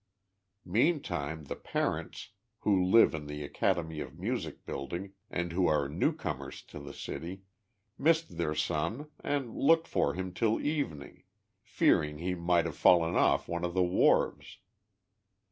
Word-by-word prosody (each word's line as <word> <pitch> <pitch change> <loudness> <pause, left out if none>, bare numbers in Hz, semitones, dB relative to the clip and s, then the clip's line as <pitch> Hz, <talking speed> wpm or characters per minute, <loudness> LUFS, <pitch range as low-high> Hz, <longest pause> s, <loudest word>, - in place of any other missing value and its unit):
Meantime 90 - 0
the 70 - -5
parents, - - -3 0.3
who 95 -3 +3
live 95 +3 +6
in 75 -2 -5
the 75 0 -5
Academy 80 +2 -1
of - - -7
Music - - -4
building, 85 +9 -5 0.2
and 85 -1 -2
who 90 +1 +2
are 75 -2 +2
new 80 - +1
comers 75 - -6
to - - -10
the - - -8
city, 95 +4 -7 0.6
missed 160 - +2
their 75 -2 -1
son 85 - -2
and 135 -5 -2
looked 165 +3 +4
for - - +1
him 95 0 -4
till 110 +3 +1
evening, 140 - -3 0.4
fearing 75 0 +2
he 90 +4 -2
might 85 -1 +2
have 80 - -4
fallen 85 -1 +5
olT - - +3
one 85 0 -3
of 85 0 -2
the 95 - +4
wharves. 90 +1 +2
85 Hz, 145 wpm, -31 LUFS, 75-105 Hz, 0.6 s, live